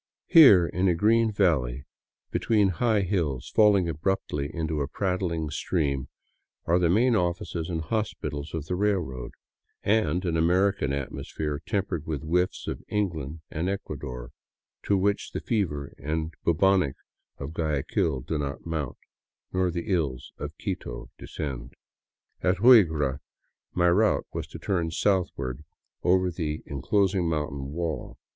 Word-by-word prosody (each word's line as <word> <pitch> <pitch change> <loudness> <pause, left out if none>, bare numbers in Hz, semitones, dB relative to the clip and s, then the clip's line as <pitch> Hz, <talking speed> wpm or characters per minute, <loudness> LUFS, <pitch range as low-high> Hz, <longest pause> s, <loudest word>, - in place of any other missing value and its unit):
Here, 130 - +8
in 90 +3 0
a 90 - +3
green 110 +5 +3
valley 70 - +1 0.5
be - - 0
tween 105 -4 +3
high 105 +4 +2
hills 85 -10 -1
falling 105 -4 +5
abruptly 80 -3 -1
into 80 -3 -2
a 70 - -1
prattling 85 -3 -2
stream, 70 -6 -1 0.6
are 85 +2 +3
the 85 -2 +3
main 115 +6 +4
offices 85 -2 -1
and 80 -2 -2
hospitals 80 -6 -3
of 80 -3 -4
the 90 - -2
railroad, 90 -11 -1 0.5
and 90 -4 +1
an 85 -2 0
American 90 -1 +2
atmosphere, 70 +1 -4
tempered 95 -6 -2
with 75 -2 -3
whiffs 90 +3 0
of - - -4
England 80 -7 -2
and 85 +4 -1
Ecuador, 70 -10 -5 0.5
to 100 - +3
which 100 +2 0
the - - -2
fever 80 - -2
and 80 +3 -2
bubonic 90 -3 +3 0.4
of 70 +3 -6
Guayaquil 75 -2 0
do 75 +4 -3
not 70 -1 -4
mount, 80 -6 -3 0.6
nor 90 0 +2
the 85 0 -3
ills 65 -7 -2
of - - -6
Quito - - -5
descend. 65 -5 -6 0.7
At 90 0 +2
Huigra 80 - +5 0.6
my 90 0 +4
route 105 +4 +3
was - - -4
to - - -9
turn 85 -5 -1
southward 80 -8 -1 0.4
over 90 0 +3
the 80 -3 -3
enclosing 90 +5 +1
moun 75 -2 -1
tain 70 0 -6
wall. 85 -2 -4
85 Hz, 140 wpm, -27 LUFS, 75-95 Hz, 0.7 s, Here